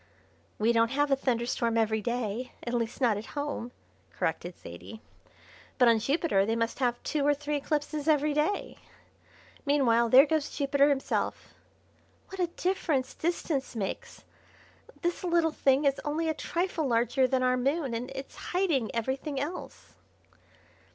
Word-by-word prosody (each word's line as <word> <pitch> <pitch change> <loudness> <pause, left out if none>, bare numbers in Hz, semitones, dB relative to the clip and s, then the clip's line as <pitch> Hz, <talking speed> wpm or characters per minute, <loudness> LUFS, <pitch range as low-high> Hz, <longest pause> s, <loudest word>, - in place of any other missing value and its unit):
"We 225 +2 +2
don't 230 0 +3
have 290 +2 +1
a - - +6
thunderstorm 235 -3 0
every 220 -1 +1
day 235 +1 -3
at 240 - -3
least 235 +2 -2
not 230 -5 +3
at 210 - -7
home," 285 -5 -3 0.4
corrected 170 +2 -3
Zaidie, 85 - -10 0.8
"but 250 - +5
on 230 -1 +5
Jupiter 270 - +1
they 225 +3 0
must 230 +2 -1
have 245 -2 +1
two 300 -2 -1
or 290 +1 +3
three 295 +1 -2
eclipses 295 +1 -2
every 300 -1 +3
day. 300 +7 -1 0.8
Meanwhile, 240 -5 +3
there 265 +4 +8
goes 310 -1 0
Jupiter 280 0 +3
himself. 275 -2 -2 0.8
What 385 - -9
a 355 - +2
difference 335 -6 -1
distance 315 -6 -2
makes! 200 -4 -5 0.8
This 345 +1 -1
little 340 -2 +2
thing 275 -1 +2
is 275 -1 +2
only 310 +3 -1
a - - +1
trifle 340 -2 -2
larger 245 +2 +2
than 255 0 +1
our 255 0 +3
Moon, 275 +1 0
and 240 +3 -3
it's 270 0 -7
hiding 335 - 0
everything 265 +4 -2
else." 305 +6 -6
270 Hz, 150 wpm, -29 LUFS, 235-300 Hz, 0.8 s, there